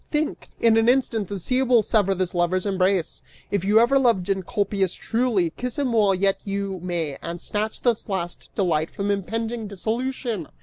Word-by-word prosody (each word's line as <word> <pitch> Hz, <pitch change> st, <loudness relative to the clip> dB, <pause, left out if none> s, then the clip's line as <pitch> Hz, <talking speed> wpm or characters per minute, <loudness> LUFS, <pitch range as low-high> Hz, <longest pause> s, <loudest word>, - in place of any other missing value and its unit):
Think! 300 Hz, 0 st, -2 dB
In 225 Hz, -1 st, +4 dB
an 225 Hz, +1 st, +4 dB
instant 245 Hz, -5 st, +1 dB
the 200 Hz, -, -4 dB
sea 250 Hz, +8 st, 0 dB
will 245 Hz, -4 st, +4 dB
sever 200 Hz, -3 st, +2 dB
this 185 Hz, -1 st, -2 dB
lover's 180 Hz, +2 st, +1 dB
embrace! 190 Hz, -3 st, 0 dB, 0.3 s
If 200 Hz, -3 st, 0 dB
you 210 Hz, +3 st, +5 dB
ever 255 Hz, +4 st, +4 dB
loved 230 Hz, -8 st, +2 dB
Encolpius 195 Hz, 0 st, 0 dB
truly, 225 Hz, -8 st, 0 dB
kiss 250 Hz, +6 st, -4 dB
him 270 Hz, -4 st, 0 dB
while 205 Hz, -4 st, +4 dB
yet 195 Hz, +1 st, +1 dB
you 200 Hz, -1 st, -3 dB
may 170 Hz, -5 st, -3 dB
and 170 Hz, +1 st, -5 dB
snatch 215 Hz, +4 st, -2 dB
this 235 Hz, -3 st, 0 dB
last 175 Hz, -3 st, -4 dB
delight 165 Hz, -5 st, +1 dB
from 200 Hz, 0 st, -2 dB
impending 225 Hz, +3 st, -3 dB
dissolution!" 225 Hz, -, -3 dB
200 Hz, 175 wpm, -24 LUFS, 185-230 Hz, 0.3 s, you